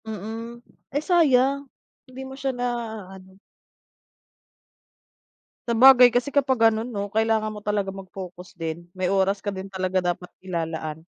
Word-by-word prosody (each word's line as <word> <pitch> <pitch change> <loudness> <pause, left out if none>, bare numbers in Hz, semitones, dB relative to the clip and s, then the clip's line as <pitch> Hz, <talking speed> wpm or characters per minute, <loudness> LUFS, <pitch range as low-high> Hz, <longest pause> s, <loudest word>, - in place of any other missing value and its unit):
Mhm, 225 +3 -7 0.3
eh, - - 0
sayang, 280 -5 +3 0.4
hindi 255 +1 -9
mo 265 - -9
siya 270 0 -3
na 245 - -1 0.5
ano. 190 0 -15 2.3
Sabagay 250 +1 +8
kasi 245 +4 -1
kapag 270 -2 +2
gano'n 225 +1 +3
'no, 200 -3 -5
kailangan 220 0 +1
mo 210 - -9
talaga 205 -2 -1
mag-focus 185 -2 -10
din, 165 +1 -5
may 185 +1 0
oras 195 +1 +1
ka 205 - -1
din, 190 0 -7
talaga 185 -1 -1
dapat 175 0 -3
ilalaan. 160 -3 -4
210 Hz, 135 wpm, -24 LUFS, 185-245 Hz, 2.3 s, Sabagay